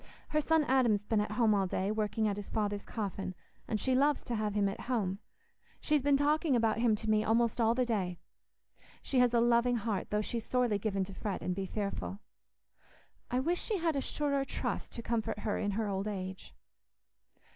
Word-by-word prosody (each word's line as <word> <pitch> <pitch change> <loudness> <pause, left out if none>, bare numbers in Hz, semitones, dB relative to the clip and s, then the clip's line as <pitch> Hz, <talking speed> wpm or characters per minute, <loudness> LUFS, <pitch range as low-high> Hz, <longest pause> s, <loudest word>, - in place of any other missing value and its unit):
Her 305 - +2
son 320 +1 +3
Adam's 245 -7 +3
been 215 -1 +2
at 210 - -3
home 220 -1 +3
all 195 -2 +2
day, 190 +2 -1
working 215 0 0
at 205 - 0
his 205 -1 -7
father's 205 -2 -1
coffin, 195 -4 -4 0.3
and 215 - -1
she 260 - +1
loves 285 +3 +3
to 245 - -4
have 215 -2 -1
him 205 -1 +3
at 195 - -4
home. 200 -6 0 0.6
She's 300 -2 +2
been 280 +1 +4
talking 295 0 +2
about 225 -2 +2
him 230 -2 +3
to 220 +1 -6
me 215 0 +3
almost 230 +1 +2
all 225 +1 +3
the 255 0 +2
day. 190 -7 -1 0.9
She 265 - +1
has 250 -1 +5
a 235 - +3
loving 240 +1 +3
heart, 220 -3 -2
though 210 0 +1
she's 230 +1 -3
sorely 245 -5 +1
given 200 -2 0
to 195 +1 -7
fret 200 0 -4
and 180 - -1
be 190 +1 -3
fearful. 200 0 -3 1.1
I 250 - +1
wish 345 +6 0
she 430 - -1
had 330 -3 0
a 275 - 0
surer 280 0 0
trust - - -3
to 235 - -6
comfort 230 -3 -1
her 210 -1 -1
in 205 - 0
her 220 -2 0
old 195 +1 -2
age." 190 -2 -6
220 Hz, 205 wpm, -32 LUFS, 205-250 Hz, 1.1 s, has